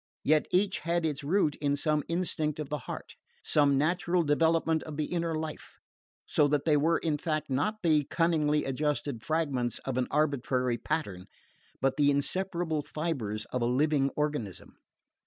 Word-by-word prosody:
Yet 155 +1 +3
each 190 +1 +1
had 170 0 0
its 145 -3 -2
root 160 0 +2
in 145 -1 0
some 150 +1 0
instinct 165 -3 -1
of 150 -3 -4
the 150 0 -2
heart, - - -6 0.3
some 145 -2 +3
natural 170 +3 +1
development 160 +1 +2
of 155 -2 -8
the 155 - 0
inner 170 -1 -2
life, 155 -1 -6 0.5
so 150 - +3
that 145 -1 0
they 155 -2 +4
were 160 +3 +3
in 150 -3 -1
fact 155 -3 -2
not 210 +11 -1
the 155 -3 +4
cunningly 155 -3 +1
adjusted 140 -2 -2
fragments 140 -6 -1
of 130 -1 -1
an 125 - 0
arbitrary 130 -5 0
pattern 100 - -3 0.5
but 135 +1 +1
the 145 -1 +4
inseparable 165 +2 -1
fibres 140 -9 -3
of 125 - 0
a - - +2
living 140 +2 +2
organism. 145 -10 -3
150 Hz, 160 wpm, -29 LUFS, 140-165 Hz, 0.5 s, they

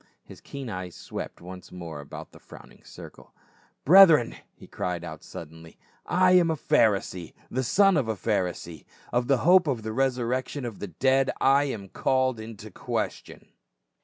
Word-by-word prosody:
His - - -14
keen 140 -2 -8
eyes 90 -5 -6
swept - - -8
once 90 +1 -11
more 85 -4 -8
about 70 - -10
the - - -16
frowning - - -16
circle. - - -14 0.2
" - - -37
Brethren 165 -7 +7
!" - - -45
he - - -13
cried 90 -1 -4
out 80 -3 -9
suddenly, 80 0 -11 0.2
" - - -44 0.2
I - - +5
am 180 -2 +5
a 160 - +1
Pharisee, 100 - 0 0.2
the 130 +1 -1
son 195 - +4
of 135 -6 0
a 110 - -1
Pharisee; 90 -5 -3 0.3
of 120 0 +1
the 135 -1 +3
hope 180 -1 +6
and 120 -6 -2
resurrection 125 +2 -1
of 115 -4 -7
the 105 - -5
dead 130 - +1
I 140 +2 +4
am 110 -8 -5
called 130 +3 0
in 110 0 -9
question 105 -1 -6
115 Hz, 170 wpm, -26 LUFS, 90-135 Hz, 0.3 s, Brethren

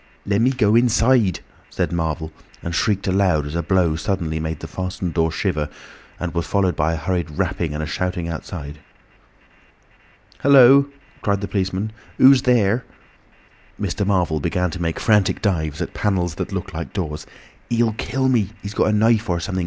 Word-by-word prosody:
"Lemme 105 +5 +2
go 115 -6 +2
inside," 120 -4 +3 0.3
said - - -2
Marvel, 80 -2 -2 0.3
and 85 - -4
shrieked 100 +3 0
aloud 95 -6 +2
as 75 - -6
a 85 - 0
blow 85 -2 +1
suddenly 80 -1 -2
made 80 -1 -4
the - - -7
fastened 90 -2 -4
door 80 -1 +1
shiver 75 -1 -1 0.5
and 85 -2 -4
was 85 0 -2
followed 95 -3 +1
by 80 +2 +1
a - - -2
hurried 85 +2 -2
rapping 75 +1 -2
and 75 - -3
a - - -2
shouting 90 +2 -3
outside. 80 -3 -7 1.6
"Hullo," 140 0 +6 0.3
cried 100 -1 0
the 100 - -3
policeman, 95 +1 -2 0.3
"who's 135 -1 +7
there?" 120 -2 +2 1.0
Mr. 100 - -2
Marvel 90 -6 +1
began 90 +3 -1
to 85 - -6
make 80 -1 -2
frantic 105 -3 +2
dives 80 -5 -1
at - - -8
panels 90 -5 0
that - - -5
looked - - -5
like - - -6
doors. 80 -6 -4 0.4
"He'll 115 -1 +2
kill 130 +4 -1
me—he's 105 -4 -1
got - - +2
a - - +3
knife 110 +1 +2
or 85 -1 +1
something. 95 +2 -3
95 Hz, 170 wpm, -21 LUFS, 80-105 Hz, 1.6 s, who's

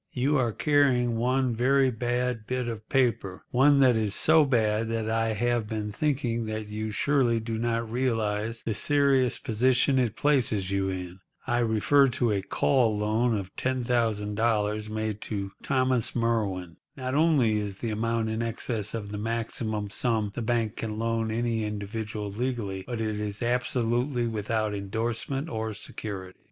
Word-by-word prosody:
You 135 +4 +1
are 120 -3 +1
carrying 130 -3 +2
one 125 +2 +1
very 130 +2 +3
bad 120 -1 -2
bit 125 -1 -2
of 110 -2 -6
paper—one 130 +3 +2
that 130 -3 +5
is 105 -2 0
so 160 0 +5
bad 110 -4 +1
that 115 -1 -2
I 115 0 +1
have 120 0 0
been 105 -1 -3
thinking 120 -3 -1
that 110 0 -3
you 110 +1 -3
surely 120 0 +2
do 110 0 -4
not 115 0 -1
realise 115 -2 -1
the 115 - -1
serious 135 +2 +3
position 130 +4 +2
it 115 -4 0
places 115 -10 +1
you 95 0 0
in. 90 0 -5 0.3
I 120 0 +1
refer 120 +5 +4
to 120 -4 +2
a 100 -2 0
call 115 +2 +2
loan 110 +2 +1
of 95 -2 -7
$10,000 110 -3 0
made 110 -1 -3
to 100 -2 -4
Thomas 130 -3 +1
Merwin. 100 -8 -1 0.2
Not 130 -1 -3
only 140 -8 +3
is 100 -2 -4
the 115 +1 -3
amount 115 +1 -1
in 110 +1 -2
excess 115 -2 -2
of 100 -3 -5
the 105 - -4
maximum 110 -2 -2
sum 110 -3 0
the 120 - -4
bank 115 -2 -1
can 110 -1 -4
loan 115 0 -1
any 115 0 -1
individual 105 0 -4
legally, 105 -4 -3
but 120 -2 -4
it 110 -1 -2
is 105 +1 -3
absolutely 120 +1 0
without 110 -1 -1
endorsement 115 +8 -3
or 110 -7 -3
security. 95 -3 -7
115 Hz, 155 wpm, -27 LUFS, 105-125 Hz, 0.3 s, that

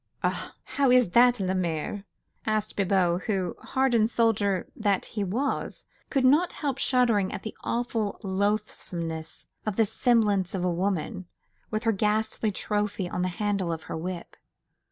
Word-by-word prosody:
"Ah! - - -1
how 275 -2 +1
is 250 -6 +5
that, 245 +1 +5
la 190 -1 0
mère?" 185 +2 -2 0.4
asked 215 -1 0
Bibot, 185 -3 +2
who, 190 -5 -1
hardened 240 -4 +2
soldier 205 -5 +1
though 205 -4 +2
he 210 - -3
was, 230 +9 -2 0.2
could 270 -3 +2
not 300 +7 +4
help 275 -3 -2
shuddering 235 -7 +3
at - - -6
the 220 - -6
awful 235 -3 -1
loathsomeness 180 -5 -2 0.2
of 215 -3 -2
this 220 -2 +1
semblance 205 -6 +2
of 180 - -2
a 180 -1 +1
woman, 180 -1 -2 0.4
with 215 0 -2
her 225 - +3
ghastly 215 +1 0
trophy 205 -1 -1
on 180 - -3
the 180 - +1
handle 195 -1 -1
of 160 -1 -4
her - - -5
whip. 175 +1 -5
205 Hz, 155 wpm, -27 LUFS, 185-225 Hz, 0.4 s, is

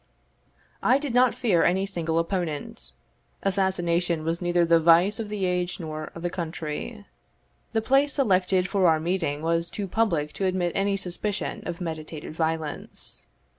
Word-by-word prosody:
I 255 - +4
did 280 -3 -3
not 245 -1 +4
fear 220 -9 +2
any 190 +2 +2
single 165 -4 -2
opponent; 165 - -3 0.5
assassination 175 -4 +1
was 165 +2 -1
neither 175 -1 +2
the 165 0 +5
vice 170 +6 +5
of 220 -2 -4
the 205 -2 -1
age 180 0 -1
nor 155 -2 -5
of 170 - -8
the 175 - 0
country; 170 +5 -5 0.7
the 220 -1 +1
place 275 +4 +3
selected 190 -7 +2
for 195 -2 +3
our 160 -1 +4
meeting 160 -3 -1
was 165 +1 0
too 205 -2 -4
public 175 -8 0
to 195 - -2
admit 185 -2 +1
any 195 0 +1
suspicion 195 +3 -3
of 170 - -4
meditated 160 -3 -6
violence. 160 -1 -4
175 Hz, 155 wpm, -26 LUFS, 165-195 Hz, 0.7 s, the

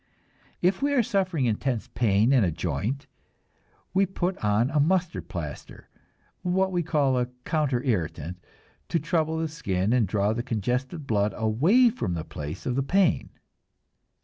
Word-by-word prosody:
If 185 +5 +2
we 285 +1 +1
are 245 - +4
suffering 190 - 0
intense 120 +1 -1
pain 110 +2 +3
in 125 -5 +5
a 90 - +2
joint, 90 - -2 0.9
we 195 +1 +3
put 185 0 -1
on 105 +5 +2
a 150 - +2
mustard 175 +3 +1
plaster, 75 -6 -7 0.5
what 190 +1 +1
we 175 -1 +1
call 140 -5 +1
a 125 - 0 0.2
counter 140 -6 0
irritant, 90 - -2 0.5
to 165 - +1
trouble 160 0 0
the 160 0 -1
skin 100 - -1
and 120 -5 +3
draw 100 +2 +1
the 120 - -2
congested 125 - -2
blood 105 -4 +1
away 165 - +4
from 90 - -3
the 80 - -3
place 75 0 -7
of 125 - -1
the 135 - +2
pain. 185 +6 +2
130 Hz, 155 wpm, -26 LUFS, 105-170 Hz, 0.9 s, in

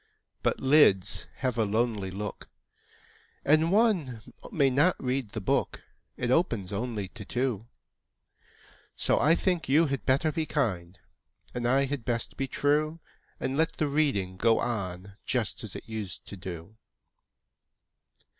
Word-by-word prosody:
But - - 0
lids 130 -9 +4
have 125 -3 -2
a - - +4
lonely 110 -2 0
look, 100 +2 -6 1.0
And 155 +3 +4
one 190 - +2 0.3
may 140 -4 +3
not 145 +8 +4
read 130 -3 -1
the 110 - -5
book 95 - 0 0.3
It 120 0 -1
opens 115 - +1
only 105 -2 -3
to 110 -1 -9
two; 120 -2 -2 1.3
So - - +2
I 155 +4 +5
think 175 -5 0
you 155 +5 +5
had 140 -2 -2
better 140 +4 +2
be 160 -1 -2
kind, 95 - -2 0.5
And 120 -1 -1
I 135 +2 +3
had 135 -2 -3
best 115 -1 -2
be 135 - -2
true, 150 +4 +1 0.4
And 130 - -2
let 160 +2 +1
the 155 - -1
reading 135 -11 0
go 115 +3 +4
on, 100 -4 -4
Just 120 -4 -1
as 110 - -7
it - - -8
used 110 -5 -6
to - - -7
do. 90 +2 -8
125 Hz, 145 wpm, -28 LUFS, 105-145 Hz, 1.3 s, I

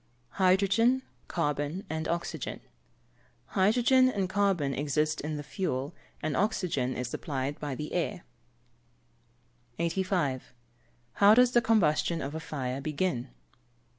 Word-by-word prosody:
_ - - -21
Hydrogen, 200 +7 +3 0.2
carbon, 150 +3 -2
and 160 0 -3
oxygen. 170 -4 -3 0.9
Hydrogen 245 +6 +4
and 200 -6 -1
carbon 190 -8 +1
exist 150 +2 0
in 150 +1 -3
the 145 - -5
fuel, 145 -4 -3 0.3
and 155 -2 -1
oxygen 175 - 0
is 125 0 -3
supplied 135 +2 -3
by 145 -3 -4
the 150 +3 -6
air. 180 +1 -2 1.5
85. 170 -7 -1 0.6
_How 205 +2 +8
does 250 0 +5
the 240 - +4
combustion 170 -7 +2
of 140 0 -4
a 160 - -3
fire 135 -4 -4
begin? 150 -3 -2
165 Hz, 120 wpm, -29 LUFS, 145-195 Hz, 1.5 s, How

